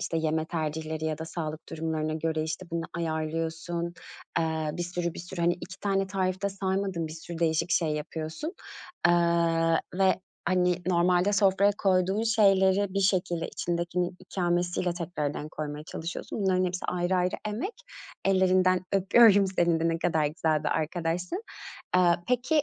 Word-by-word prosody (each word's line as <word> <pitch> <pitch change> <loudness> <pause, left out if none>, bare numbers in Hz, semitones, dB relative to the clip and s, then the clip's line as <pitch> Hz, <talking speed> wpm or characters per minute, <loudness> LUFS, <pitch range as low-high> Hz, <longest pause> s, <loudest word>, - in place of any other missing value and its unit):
işte, 165 - -2
yeme 160 0 0
tercihleri 160 -1 -3
ya 155 -1 -1
da 160 - -4
sağlık 160 -1 -5
durumlarına 155 -1 -2
göre, 160 0 -1
işte, 160 +4 -4
bunu 165 -1 -2
ayarlıyorsun. 165 +1 -2 0.4
Eee, 160 -2 0
bir 175 - -3
sürü, 175 -1 -3
bir - - -8
sürü, 175 0 -7
hani, 175 +1 +3
2 190 +3 -10
tane 195 -1 +1
tarif 190 -1 -1
de 200 - +2
saymadın, 190 -3 -2
bir 155 - -7
sürü 165 +1 -8
değişik 165 +1 +1
şey 165 -1 +2
yapıyorsun. 160 - -4 0.5
Aaa, 170 -1 +3 0.2
ve, 190 0 +3 0.3
hani, 180 -1 +3
normalde 180 +2 +3
sofraya 200 0 +4
koyduğun 190 +1 +2
şeyleri, 200 -3 +3
bir 195 - +1
şekilde 185 -3 +1
içindekinin 175 +1 -2
ikamesiyle 175 -1 -1
tekrardan 155 -4 -3
koymaya 150 0 -5
çalışıyorsun. 165 +7 -5
Bunların 185 -1 +2
hepsi, 180 0 -3
ayrı 180 +1 0
ayrı 180 0 +1
emek. 240 - -3 0.5
Ellerinden 185 -1 +4
öpüyorum 200 +1 +6
seni 175 -3 +1
de, 165 - +2
ne 165 0 0
kadar 160 -3 +1
güzel 155 0 0
bir - - +2
arkadaşsın. 175 - -2 0.5
Aaa, 175 -2 +5
peki, 255 +5 +2
175 Hz, 150 wpm, -28 LUFS, 160-190 Hz, 0.5 s, öpüyorum